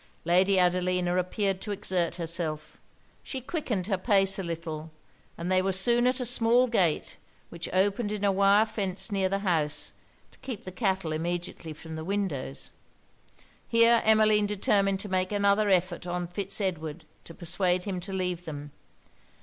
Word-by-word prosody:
Lady 185 +3 +4
Adelina 180 0 +2
appeared 190 +1 -1
to - - -6
exert 185 -4 0
herself. 165 -3 -3 0.4
She 265 - -5
quickened 250 - -3
her 195 -2 -1
pace 195 -1 +3
a - - -2
little; 165 -2 -5 0.5
and 170 +2 -3
they 185 0 +4
were 195 +1 0
soon 235 +6 +2
at 255 +1 +1
a 250 - -2
small 240 +1 +3
gate, 190 -10 0 0.3
which 170 -1 -6
opened 200 +3 +1
in 210 -1 -4
a 200 - +4
wire 200 +2 +4
fence 200 -1 -3
near 195 -2 +1
the 195 - 0
house 155 -5 -1 0.4
to - - -19
keep 245 -7 -6
the 185 - -7
cattle 190 -5 -1
immediately 170 0 -4
from 160 +1 -9
the 160 - -5
windows. 165 - -3 1.0
Here 230 0 +5
Emmeline 215 -1 +4
determined 195 -1 +1
to 210 - -6
make 185 0 0
another 205 0 +2
effort 180 -1 +1
on 175 0 -2
Fitz 195 +4 -3
Edward 165 -5 -3 0.2
to 165 - -11
persuade 180 +1 0
him 190 -2 -3
to 180 - -8
leave 180 -2 -2
them. 145 -2 -7
190 Hz, 165 wpm, -28 LUFS, 175-205 Hz, 1.0 s, Here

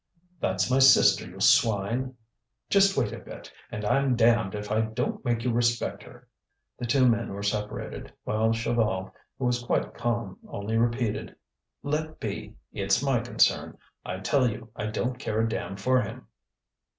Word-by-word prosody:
"That's 130 - 0
my 130 - +4
sister, 135 0 +6
you - - -12
swine! 115 +5 +3 0.6
Just 195 0 +4
wait 120 -6 +1
a - - -6
bit, - - -11 0.2
and 105 0 -4
I'm 130 +3 +2
damned 115 -4 +3
if 105 0 -5
I 110 +1 +2
don't 110 +2 -2
make 120 -3 0
you 125 - +1
respect 120 0 0
her." - - -15 0.5
The 120 - -3
two 130 +2 +4
men 115 -1 +1
were 100 +1 -5
separated, 105 +1 -3
while 110 +1 +1
Chaval, 115 -4 0 0.3
who 130 - -2
was 125 0 +1
quite - - -1
calm, 115 -5 -3
only 100 +2 -4
repeated: 115 -1 0 0.5
"Let 155 +2 -2
be! - - -5 0.2
it's - - +1
my - - +2
concern. - - +1 0.3
I 95 +1 -5
tell 130 +5 +2
you 115 0 -8
I 105 - -3
don't 125 +3 -2
care 110 -5 -2
a 115 - +1
damn 105 -3 -4
for 130 +5 +2
him." - - -7
115 Hz, 165 wpm, -27 LUFS, 105-125 Hz, 0.6 s, sister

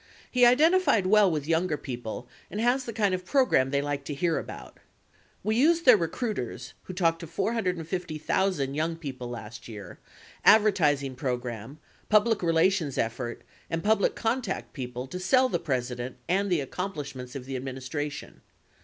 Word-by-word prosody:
He 250 -1 +6
identified 295 - +4
well 205 0 +5
with 150 -3 -2
younger 165 -1 +1
people 120 -3 -6 0.2
and 210 - -5
has 245 +3 +2
the 235 - -4
kind 205 -3 +1
of 185 0 -2
pro 260 +8 +3
gram 130 - +2
they 140 +1 0
like 145 -1 -3
to 145 - -4
hear 165 +2 +1
about. - - -9 0.6
We 215 - +1
used 330 +7 +3
their 250 -3 +9
recruiters 180 - -3
(who 185 - -7
talked 165 -3 +2
to 170 - -7
450,000 180 - -1
young 160 +3 -1
people 130 -6 -6
last 115 -1 -8
year), 105 -6 -9 0.4
advertising 155 -11 +4
pro 125 -1 -1
gram, 120 +2 -7 0.3
public 215 0 +4
relations 165 -3 +2
effort, 120 +1 -3 0.3
and 165 0 -2
public 215 -1 +2
contact 225 -3 -2
people 125 -2 -5
to 180 +7 -6
sell 255 +8 +3
the - - 0
President 125 -4 -3
and 195 +2 +1
the 170 -4 +2
accomplishments 145 -5 -5
of 130 -2 -6
the 135 0 -5
administra 135 +3 -4
tion. 145 - -10
165 Hz, 160 wpm, -27 LUFS, 130-205 Hz, 0.6 s, their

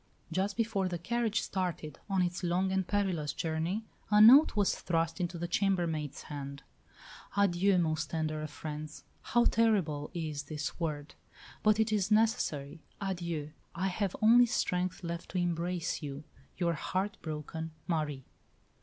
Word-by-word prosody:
Just 195 +4 -1
before 215 -5 +1
the 175 -1 -2
carriage 225 +4 0
started 175 -5 -3
on 190 -2 +2
its 175 +1 -2
long 180 +2 +1
and 190 -1 0
perilous 185 -8 0
journey, 165 +7 -2 0.2
a 210 0 +5
note 250 +8 +9
was 205 -2 +3
thrust 165 +1 -1
into 175 0 -2
the 175 +1 -3
"chambermaid's" 170 -6 0
hand 140 -1 -7 0.7
"Adieu, 195 -1 +3
most 160 -2 0
tender 155 -1 -2
of 155 - -4
friends. 150 0 -7 0.2
How 240 0 +2
terrible 185 -11 +2
is 155 -4 -3
this 150 +2 -4
word! 150 -3 -3 0.5
But 215 0 +4
it 220 0 +2
is 205 -2 +1
necessary. 210 - +1 0.2
Adieu! 170 -6 -3 0.2
I 185 +3 0
have 190 0 -2
only 240 +2 +7
strength 180 -5 -1
left 170 0 -5
to - - -1
embrace 175 0 -1
you. 145 -1 -6 0.3
Your 170 -2 +1
heart 190 +6 -2
broken 160 +1 -5 0.2
Marie." 150 -5 -2
175 Hz, 145 wpm, -31 LUFS, 155-200 Hz, 0.7 s, note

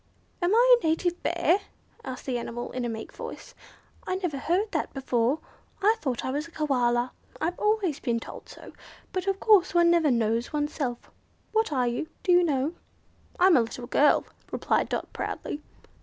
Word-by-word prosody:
"Am 350 +1 +2
I - - +7
a - - -18
native 345 +2 0
Bear?" 340 +2 +2 0.4
asked 260 -1 -7
the 250 -3 -1
animal 240 +1 -5
in 255 - -3
a - - -1
meek 220 -1 -6
voice. - - -8 0.5
"I 370 - 0
never 355 -7 -2
heard 375 +9 0
that - - -2
before. 255 0 +1 0.4
I 420 +3 +4
thought 260 - -2
I 260 - -1
was 295 +4 -2
a - - -17
Koala. 250 -6 +1 0.3
I've 340 +3 -2
always 420 -8 +1
been 235 -2 0
told - - -10
so, - - -12 0.4
but 370 +1 -2
of 390 0 0
course 395 -5 +4
one 340 0 +6
never 335 -3 +4
knows 230 -1 +1
oneself. 295 -5 -3 0.4
What 440 -5 +1
are 255 -4 +1
you? 245 +7 -2
Do 365 - +2
you 355 0 +6
know?" 290 -1 0 0.7
"I'm 365 -1 +6
a 255 - +6
little 235 +2 -5
girl," 290 +4 +4 0.3
replied - - 0
Dot, - - -3
proudly. 295 - -4
305 Hz, 180 wpm, -27 LUFS, 250-360 Hz, 0.7 s, I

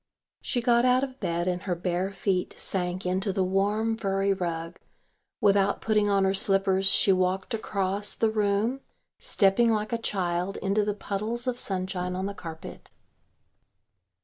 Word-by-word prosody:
She 245 -2 -2
got 235 0 +4
out 255 +1 +3
of 265 -1 -5
bed 170 +1 -2
and 180 0 -1
her 185 -3 -2
bare 180 +2 -2
feet 195 -2 -2
sank 180 -1 -2
into 190 +2 0
the 190 0 0
warm 205 +4 +1
furry 195 -2 0
rug; 170 -2 -4 0.6
without 200 -1 +3
putting 210 -2 +1
on 200 -1 +3
her 190 0 +2
slippers 195 -1 +2
she 195 - +5
walked 185 +4 0
across 200 -2 0
the 225 -1 +1
room, 215 +5 0 0.4
stepping 230 - +3
like 215 +1 -1
a 230 - 0
child 180 -2 -2
into 200 +2 0
the 205 0 -1
puddles 215 +4 -3
of 250 -1 -2
sunshine 185 -1 -3
on 190 +1 -2
the 200 - -3
carpet. 165 -4 -9
195 Hz, 155 wpm, -27 LUFS, 185-215 Hz, 0.6 s, she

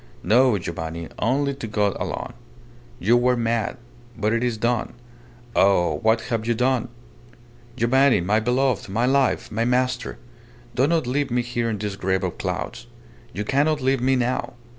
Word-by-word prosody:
No, 125 0 +4
Giovanni. 85 -2 -5
Only 140 +5 +1
to 135 -4 -6
God 105 -2 0
alone. - - -4 0.6
You 110 +6 +3
were 125 +1 +3
mad 115 0 -1 0.4
but 105 0 0
it 115 +1 0
is 120 -2 0
done. 120 +1 -1 0.6
Oh! 90 -6 +3
what 110 +5 +2
have 115 -1 -3
you 120 - +2
done? 125 0 +1 0.9
Giovanni, 130 +2 +4
my 100 +5 +2
beloved, 125 -2 0
my 115 +5 +1
life, 135 -2 +1
my 115 +1 0
master, 125 +1 0 0.6
do 130 +4 +2
not 165 -3 +1
leave 135 +3 -1
me 120 0 0
here 120 -1 -2
in 110 - -2
this 105 -1 -4
grave 95 -1 0
of - - -3
clouds. - - -4 0.4
You 105 - -4
cannot 145 +6 +1
leave 135 -1 +1
me 130 +1 +3
now. 125 +1 -1
120 Hz, 160 wpm, -23 LUFS, 105-130 Hz, 0.9 s, No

